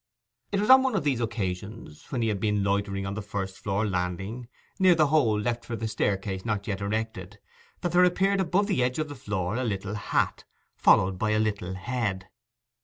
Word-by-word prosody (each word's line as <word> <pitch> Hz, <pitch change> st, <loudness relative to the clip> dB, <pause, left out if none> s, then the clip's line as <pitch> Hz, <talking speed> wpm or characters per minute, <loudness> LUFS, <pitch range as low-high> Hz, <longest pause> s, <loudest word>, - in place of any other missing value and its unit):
It 200 Hz, -, +1 dB
was 210 Hz, +5 st, +4 dB
on 260 Hz, 0 st, +9 dB
one 260 Hz, -3 st, 0 dB
of -, -, 0 dB
these 135 Hz, -5 st, 0 dB
occasions, 100 Hz, -5 st, -5 dB
when 125 Hz, -3 st, -1 dB
he 115 Hz, -, +1 dB
had 105 Hz, -2 st, -1 dB
been 105 Hz, -1 st, +1 dB
loitering 100 Hz, 0 st, -1 dB
on 100 Hz, -, -3 dB
the 105 Hz, -, -4 dB
first 95 Hz, -2 st, -5 dB
floor 100 Hz, -1 st, -1 dB
landing, 95 Hz, +5 st, -3 dB, 0.3 s
near 185 Hz, -2 st, +6 dB
the 155 Hz, -2 st, +4 dB
hole 115 Hz, -9 st, +3 dB
left 115 Hz, +2 st, -2 dB
for 120 Hz, 0 st, -5 dB
the 115 Hz, 0 st, -3 dB
staircase, 100 Hz, -2 st, -1 dB
not 105 Hz, -3 st, -2 dB
yet 100 Hz, -2 st, -3 dB
erected, 105 Hz, -1 st, -3 dB, 0.4 s
that 175 Hz, -, -1 dB
there 180 Hz, +1 st, +5 dB
appeared 195 Hz, +2 st, +2 dB
above 190 Hz, +3 st, +2 dB
the 195 Hz, -10 st, 0 dB
edge 125 Hz, +1 st, 0 dB
of 155 Hz, -1 st, -2 dB
the -, -, -6 dB
floor 105 Hz, -5 st, -3 dB
a 130 Hz, -, -1 dB
little 100 Hz, -3 st, -3 dB
hat, 105 Hz, -, -1 dB, 0.3 s
followed 95 Hz, 0 st, +4 dB
by 110 Hz, -, +1 dB
a 110 Hz, 0 st, +2 dB
little 100 Hz, -4 st, -1 dB
head. 100 Hz, -3 st, -3 dB
110 Hz, 205 wpm, -27 LUFS, 100-125 Hz, 0.4 s, on